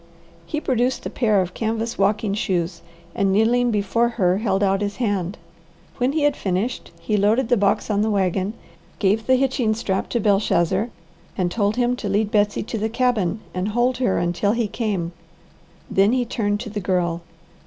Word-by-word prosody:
He 305 Hz, -, -2 dB
produced 255 Hz, -3 st, 0 dB
a -, -, -3 dB
pair 215 Hz, -5 st, +2 dB
of 180 Hz, 0 st, -4 dB
canvas 225 Hz, +1 st, -2 dB
walking 205 Hz, +1 st, +1 dB
shoes 175 Hz, -4 st, -1 dB, 0.3 s
and 195 Hz, -1 st, +1 dB
kneeling 235 Hz, +4 st, +3 dB
before 230 Hz, +2 st, +1 dB
her 190 Hz, -5 st, +1 dB
held 200 Hz, -3 st, 0 dB
out 195 Hz, 0 st, +2 dB
his 205 Hz, 0 st, -2 dB
hand. 200 Hz, -6 st, -1 dB, 0.6 s
When 255 Hz, +2 st, +1 dB
he 310 Hz, -1 st, 0 dB
had 290 Hz, -1 st, +3 dB
finished, 195 Hz, +6 st, -2 dB
he 215 Hz, -, -1 dB
loaded 220 Hz, +5 st, +2 dB
the 245 Hz, -, +5 dB
box 200 Hz, -2 st, +1 dB
on 205 Hz, 0 st, +1 dB
the 220 Hz, -, +1 dB
wagon, 195 Hz, 0 st, 0 dB, 0.4 s
gave 210 Hz, +2 st, +1 dB
the 260 Hz, -, +5 dB
hitching 255 Hz, -4 st, +1 dB
strap 195 Hz, -4 st, -2 dB
to 240 Hz, -, 0 dB
Belshazzar, 200 Hz, 0 st, +2 dB, 0.5 s
and 180 Hz, -2 st, 0 dB
told 205 Hz, +1 st, +1 dB
him 245 Hz, 0 st, +1 dB
to 210 Hz, -, -4 dB
lead 205 Hz, +1 st, +1 dB
Betsy 205 Hz, -1 st, +2 dB
to 225 Hz, 0 st, -4 dB
the 220 Hz, +2 st, -1 dB
cabin 225 Hz, -5 st, 0 dB
and 185 Hz, +2 st, -2 dB
hold 240 Hz, +4 st, +1 dB
her 245 Hz, -7 st, +1 dB
until 175 Hz, +4 st, +1 dB
he 230 Hz, -2 st, 0 dB
came. 200 Hz, -6 st, -2 dB, 0.8 s
Then 200 Hz, +4 st, +3 dB
he 255 Hz, -1 st, +1 dB
turned 205 Hz, -3 st, -1 dB
to 230 Hz, -4 st, -6 dB
the 210 Hz, -, -3 dB
Girl. 175 Hz, -3 st, 0 dB
210 Hz, 185 wpm, -22 LUFS, 195-235 Hz, 0.8 s, the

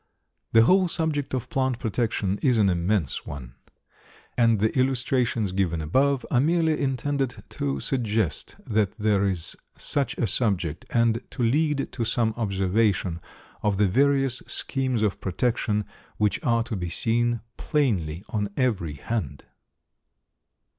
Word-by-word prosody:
The 115 Hz, 0 st, +7 dB
whole 185 Hz, +8 st, +4 dB
subject 160 Hz, -5 st, -1 dB
of 125 Hz, -, -3 dB
plant 130 Hz, -2 st, 0 dB
protection 110 Hz, -4 st, -1 dB
is 125 Hz, -5 st, +3 dB
an 100 Hz, -3 st, +4 dB
immense 85 Hz, -3 st, 0 dB
one, 65 Hz, -4 st, -7 dB, 0.8 s
and 115 Hz, -3 st, +3 dB
the 110 Hz, +2 st, +1 dB
illustrations 125 Hz, -4 st, +1 dB
given 90 Hz, -4 st, 0 dB
above 130 Hz, -, +1 dB
are 120 Hz, -, +4 dB
merely 160 Hz, +2 st, +2 dB
intended 135 Hz, -1 st, -1 dB
to 70 Hz, -1 st, -2 dB
suggest 110 Hz, -, -1 dB
that 105 Hz, -3 st, +1 dB
there 105 Hz, -2 st, +2 dB
is 85 Hz, -3 st, 0 dB, 0.2 s
such 140 Hz, -2 st, -1 dB
a 120 Hz, -, +1 dB
subject, 95 Hz, -, -1 dB
and 115 Hz, -1 st, +2 dB
to 125 Hz, -, -3 dB
lead 145 Hz, +4 st, +1 dB
to 120 Hz, -, -3 dB
some 115 Hz, 0 st, +1 dB
observation 95 Hz, -4 st, 0 dB, 0.4 s
of 105 Hz, -2 st, +1 dB
the 105 Hz, 0 st, +4 dB
various 135 Hz, +4 st, +2 dB
schemes 130 Hz, -4 st, 0 dB
of 105 Hz, -3 st, -1 dB
protection 105 Hz, +1 st, 0 dB, 0.3 s
which 105 Hz, -2 st, 0 dB
are 115 Hz, -1 st, +2 dB
to 115 Hz, -, -4 dB
be 90 Hz, -3 st, -3 dB
seen 120 Hz, +5 st, 0 dB, 0.2 s
plainly 95 Hz, -, 0 dB
on 105 Hz, -2 st, -1 dB
every 100 Hz, -, 0 dB
hand. 70 Hz, -, -4 dB
115 Hz, 135 wpm, -25 LUFS, 95-130 Hz, 0.8 s, The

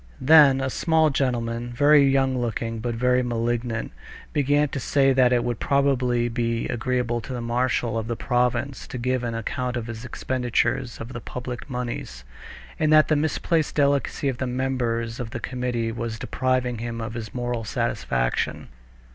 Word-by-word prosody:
Then 140 Hz, -1 st, +6 dB
a 130 Hz, 0 st, -1 dB
small 160 Hz, 0 st, +2 dB
gentleman, 120 Hz, -3 st, -1 dB
very 145 Hz, +3 st, +6 dB
young 135 Hz, -1 st, +2 dB
looking 115 Hz, -2 st, -2 dB
but 120 Hz, +1 st, -3 dB
very 125 Hz, +2 st, +2 dB
malignant, 120 Hz, -1 st, -2 dB, 0.4 s
began 145 Hz, +1 st, +2 dB
to 135 Hz, -, -4 dB
say 135 Hz, +1 st, +3 dB
that 130 Hz, -1 st, +4 dB
it 120 Hz, -1 st, +3 dB
would 120 Hz, -2 st, -2 dB
probably 130 Hz, -4 st, +2 dB
be 115 Hz, 0 st, -1 dB
agreeable 120 Hz, 0 st, -1 dB
to 130 Hz, -, -7 dB
the 125 Hz, -, -3 dB
marshal 120 Hz, -1 st, 0 dB
of 110 Hz, -, -5 dB
the 115 Hz, -, -2 dB
province 125 Hz, +2 st, -1 dB
to 125 Hz, -, -6 dB
give 125 Hz, +1 st, -1 dB
an 115 Hz, -1 st, -2 dB
account 125 Hz, +2 st, -3 dB
of 115 Hz, -, -4 dB
his 115 Hz, 0 st, -7 dB
expenditures 130 Hz, 0 st, -1 dB
of 115 Hz, +3 st, -7 dB
the 120 Hz, -, -6 dB
public 125 Hz, +3 st, -6 dB
moneys, 120 Hz, -, -5 dB, 0.6 s
and 155 Hz, -1 st, +2 dB
that 155 Hz, 0 st, +6 dB
the 155 Hz, -, +4 dB
misplaced 160 Hz, +1 st, 0 dB
delicacy 140 Hz, 0 st, +1 dB
of 130 Hz, -3 st, -2 dB
the 130 Hz, -, -1 dB
members 125 Hz, -3 st, -1 dB
of 120 Hz, -3 st, -4 dB
the 120 Hz, -, -5 dB
committee 120 Hz, -2 st, -2 dB
was 115 Hz, -1 st, -4 dB
depriving 125 Hz, -1 st, -1 dB
him 115 Hz, 0 st, -4 dB
of 110 Hz, -1 st, -5 dB
this 110 Hz, -2 st, -6 dB
moral 120 Hz, -2 st, -3 dB
satisfaction. 60 Hz, -, -1 dB
125 Hz, 170 wpm, -24 LUFS, 115-130 Hz, 0.6 s, Then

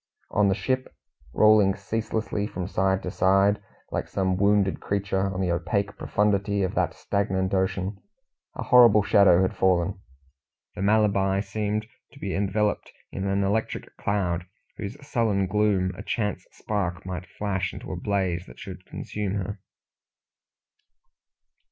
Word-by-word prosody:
On 105 Hz, -1 st, +3 dB
the 95 Hz, -, +2 dB
ship 130 Hz, +6 st, -2 dB, 0.4 s
rolling 105 Hz, -, +5 dB
ceaselessly 110 Hz, 0 st, -2 dB
from 90 Hz, -3 st, -5 dB
side 95 Hz, 0 st, +1 dB
to 90 Hz, -, -3 dB
side, 100 Hz, +1 st, +3 dB, 0.3 s
like -, -, -2 dB
some 95 Hz, -1 st, 0 dB
wounded 100 Hz, 0 st, +2 dB
creature, 100 Hz, -1 st, -1 dB
on 95 Hz, 0 st, -3 dB
the 90 Hz, -2 st, +1 dB
opaque 100 Hz, +4 st, -1 dB
profundity 100 Hz, 0 st, +1 dB
of 95 Hz, -, -1 dB
that -, -, 0 dB
stagnant 95 Hz, -2 st, -1 dB
ocean 95 Hz, +1 st, -1 dB, 0.5 s
a -, -, -4 dB
horrible 120 Hz, -5 st, +7 dB
shadow 95 Hz, -3 st, +5 dB
had 95 Hz, -, -1 dB
fallen. 95 Hz, +1 st, +1 dB, 0.7 s
The -, -, -7 dB
Malabar 100 Hz, -2 st, +2 dB
seemed 105 Hz, +1 st, -2 dB, 0.3 s
to 140 Hz, -, -15 dB
be 100 Hz, -6 st, -3 dB
enveloped 105 Hz, +1 st, 0 dB, 0.2 s
in 95 Hz, +1 st, -3 dB
an 100 Hz, 0 st, +1 dB
electric 105 Hz, +3 st, -2 dB
cloud, 90 Hz, -3 st, -1 dB, 0.3 s
whose 105 Hz, +5 st, -6 dB
sullen 110 Hz, -7 st, +1 dB
gloom 95 Hz, -2 st, +1 dB
a 100 Hz, -, -8 dB
chance 105 Hz, -1 st, -2 dB
spark 95 Hz, -4 st, -3 dB
might 90 Hz, -1 st, -5 dB
flash 95 Hz, -3 st, -2 dB
into -, -, -8 dB
a -, -, -3 dB
blaze 95 Hz, -4 st, -1 dB
that -, -, -13 dB
should -, -, -9 dB
consume 105 Hz, -2 st, -4 dB
her. 100 Hz, +1 st, -4 dB
100 Hz, 140 wpm, -26 LUFS, 95-105 Hz, 0.7 s, horrible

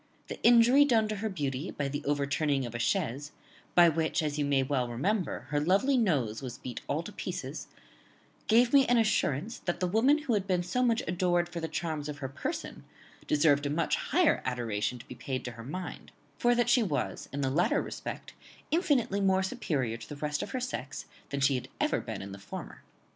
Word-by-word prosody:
The -, -, -6 dB
injury 240 Hz, +4 st, +7 dB
done 230 Hz, -6 st, +3 dB
to 215 Hz, -, -2 dB
her 220 Hz, +2 st, -2 dB
beauty 145 Hz, -3 st, -3 dB
by 145 Hz, -, -3 dB
the 145 Hz, +2 st, -4 dB
overturning 140 Hz, -1 st, 0 dB
of 120 Hz, -, -7 dB
a 120 Hz, -, -4 dB
chaise, 145 Hz, +1 st, -1 dB, 0.4 s
by 175 Hz, -1 st, +8 dB
which, 160 Hz, 0 st, +1 dB
as 150 Hz, -1 st, -2 dB
you -, -, +2 dB
may 140 Hz, -1 st, +2 dB
well 130 Hz, -2 st, -1 dB
remember, 180 Hz, -, -1 dB
her 145 Hz, 0 st, +1 dB
lovely 195 Hz, -, +3 dB
nose 140 Hz, -, +1 dB
was 125 Hz, -2 st, -6 dB
beat 125 Hz, -, -7 dB
all -, -, -1 dB
to -, -, -8 dB
pieces, -, -, -5 dB, 0.8 s
gave 235 Hz, +3 st, +4 dB
me 280 Hz, -1 st, +7 dB
an 245 Hz, -, +4 dB
assurance 215 Hz, -, +1 dB
that 175 Hz, -1 st, -3 dB
the 180 Hz, -, +1 dB
woman 255 Hz, -, +3 dB
who 250 Hz, -, 0 dB
had 200 Hz, -2 st, 0 dB
been 180 Hz, -2 st, +1 dB
so 185 Hz, +8 st, -1 dB
much 235 Hz, -2 st, +2 dB
adored 175 Hz, 0 st, +1 dB
for 175 Hz, 0 st, -6 dB
the 165 Hz, -, -3 dB
charms 155 Hz, -2 st, -3 dB
of 145 Hz, -, -5 dB
her 135 Hz, -, -4 dB
person 135 Hz, -, -5 dB, 0.4 s
deserved 145 Hz, -1 st, +3 dB
a -, -, -2 dB
much 160 Hz, +3 st, +1 dB
higher 335 Hz, +4 st, +2 dB
adoration 120 Hz, -2 st, -2 dB
to 120 Hz, -, -13 dB
be -, -, -8 dB
paid 130 Hz, +1 st, -4 dB
to 125 Hz, -, -4 dB
her 115 Hz, 0 st, -10 dB
mind; 180 Hz, +9 st, -7 dB, 0.3 s
for 240 Hz, -1 st, +3 dB
that 240 Hz, -1 st, +2 dB
she 240 Hz, +1 st, +5 dB
was 150 Hz, -, -2 dB
in 140 Hz, -, -3 dB
the 135 Hz, -1 st, 0 dB
latter 170 Hz, +6 st, +2 dB
respect -, -, -6 dB, 0.4 s
infinitely 280 Hz, -, +2 dB
more 190 Hz, -1 st, +3 dB
superior 130 Hz, -10 st, -2 dB
to 115 Hz, -, -11 dB
the 145 Hz, -, -6 dB
rest 150 Hz, 0 st, -2 dB
of -, -, -5 dB
her 260 Hz, -, -3 dB
sex 195 Hz, -, -5 dB, 0.2 s
than 140 Hz, 0 st, -3 dB
she 140 Hz, +1 st, +4 dB
had 125 Hz, -, -3 dB
ever -, -, +1 dB
been -, -, -6 dB
in 100 Hz, -, -8 dB
the 100 Hz, -, -9 dB
former." 100 Hz, -, -8 dB
160 Hz, 210 wpm, -30 LUFS, 135-215 Hz, 0.8 s, by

